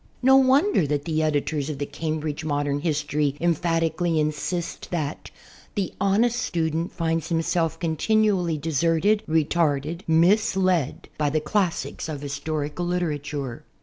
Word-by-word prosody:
No 265 +1 +7
wonder 270 - +4
that 145 0 -1
the 160 -1 0
editors 150 -1 0
of 150 - -4
the 145 - -2
"Cambridge 155 +1 -3
Modern 145 -1 -1
Vlistory" 145 -2 0
emphatically 165 0 +1
insist 155 +3 -2
that 155 -4 -3 0.5
"the 200 -4 -2
honest 225 +5 +2
student 165 0 -1
finds 165 -1 -1
himself 165 -1 0
continually 180 0 +1
deserted, 165 +7 +2
retarded, 160 0 +1
misled, 185 - +2
by 150 -1 +2
the 155 +2 +1
classics 170 +1 -1
of 145 -3 -5
historical 150 +3 -3
literature." 145 -7 -3
160 Hz, 120 wpm, -24 LUFS, 150-175 Hz, 0.5 s, No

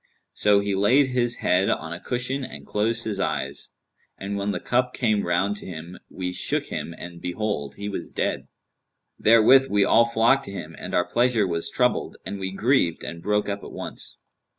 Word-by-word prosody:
So 105 -1 +4
he 100 0 -1
laid 125 +8 +4
his 120 -1 +1
head 90 +2 +3
on 80 +3 -2
a 85 - -7
cushion 125 +4 -2
and - - -8
closed 110 +2 +1
his 105 -3 -3
eyes; 70 -7 -2 0.5
and 100 +1 -4
when 100 0 -2
the - - -1
cup 125 +1 0
came 110 -6 +1
round 95 +4 +1
to - - -10
him, 85 0 -8
we 90 -1 -4
shook - - 0
him 85 - -5
and 85 -1 -9
behold, 90 -6 -3
he 100 - -6
was 105 - -5
dead.[FN#191] - - -2 0.7
Therewith 115 +4 +6
we 100 -1 +3
all 115 +1 +5
flocked 115 +4 +3
to 100 - -7
him, 85 -4 -7
and - - -5
our 90 - +3
pleasure 120 -3 +2
was 85 -2 -1
troubled - - 0
and 100 +2 -5
we 95 0 -3
grieved 100 - +1
and 85 0 -6
broke 105 +3 0
up 100 0 -4
at - - -9
once. - - -5
100 Hz, 195 wpm, -24 LUFS, 90-115 Hz, 0.7 s, Therewith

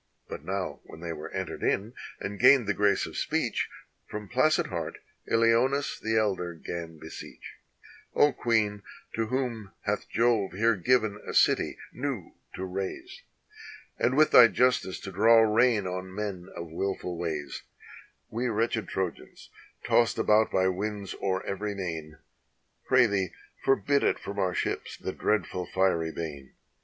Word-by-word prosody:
But - - -7
now 95 -1 -3
when - - -12
they 85 -1 -4
were 75 -1 -7
entered - - -5
in, 105 +5 0 0.3
and 100 0 -5
gained 130 +1 +7
the 100 - +1
grace 100 0 +2
of - - -9
speech, - - -1 0.4
From 105 -1 -6
placid 140 +8 +3
heart - - -4 0.3
IKoneus 115 +5 +2
the 110 0 0
elder 95 -5 0
'gan 85 0 -6
beseech: 80 +1 -10 0.6
"0 145 - +5
Queen, 105 -3 +1 0.3
to 115 0 -1
whom 115 -5 -3
hath 105 0 -2
Jove 115 -5 +2
here 115 +3 +3
given 110 0 +1
a - - -4
city - - +3 0.2
new 125 -8 -4 0.2
to 95 - -4
raise, 100 - -5 0.8
And 125 +3 +2
with 155 0 +5
thy 120 - +10
justice 125 -6 +1
to 95 - -7
draw 110 +5 +5
rein 110 -1 +3
on 95 +1 -5
men 100 -3 -4
of 85 -1 -6
mlful 90 +1 -3
ways, 80 -4 -4 0.7
We 120 +3 -1
wretched 115 0 0
Trojans, 95 -3 -5 0.3
tossed 115 -1 +3
about 110 +1 +4
by 95 0 +2
winds 100 +1 -3
o'er 95 -1 -1
every 100 +1 -3
main, 80 -5 -5 0.7
Pray 130 -1 +6
thee 95 -5 -1 0.3
forbid 140 +1 +2
it - - +2
from 100 0 -6
our 95 -2 0
ships, - - -3
the - - -5
dreadful 105 -4 -1
fiery 90 -4 +1
bane. 75 -5 -7
105 Hz, 150 wpm, -28 LUFS, 90-115 Hz, 0.8 s, thy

